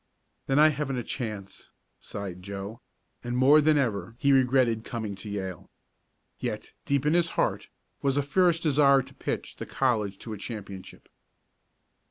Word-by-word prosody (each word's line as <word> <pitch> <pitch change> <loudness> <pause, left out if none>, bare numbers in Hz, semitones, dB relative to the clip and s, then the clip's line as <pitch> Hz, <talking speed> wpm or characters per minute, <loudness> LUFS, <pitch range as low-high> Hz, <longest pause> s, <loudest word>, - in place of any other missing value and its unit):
"Then 135 - +2
I 155 +1 +7
haven't 140 -3 -2
a 120 - -2
chance," 105 -6 -6 0.3
sighed 95 -3 -7
Joe, 100 +3 -7 0.4
and 120 +1 -2
more 140 +4 +6
than 155 0 +4
ever 115 -4 -1
he 140 +1 +3
regretted 125 -4 +3
coming 110 -4 -4
to 100 +2 -8
Yale. 95 -3 -5 0.7
Yet, - - -4 0.2
deep 140 0 +1
in 150 - +3
his 170 -1 +3
heart, - - 0 0.3
was 135 0 +1
a 145 - +2
fierce 170 +3 +3
desire 140 -4 +4
to - - -15
pitch - - -4
the - - -6
college 110 -7 0
to 110 - -7
a 105 - -7
championship. 100 -4 -8
125 Hz, 160 wpm, -27 LUFS, 105-140 Hz, 0.7 s, I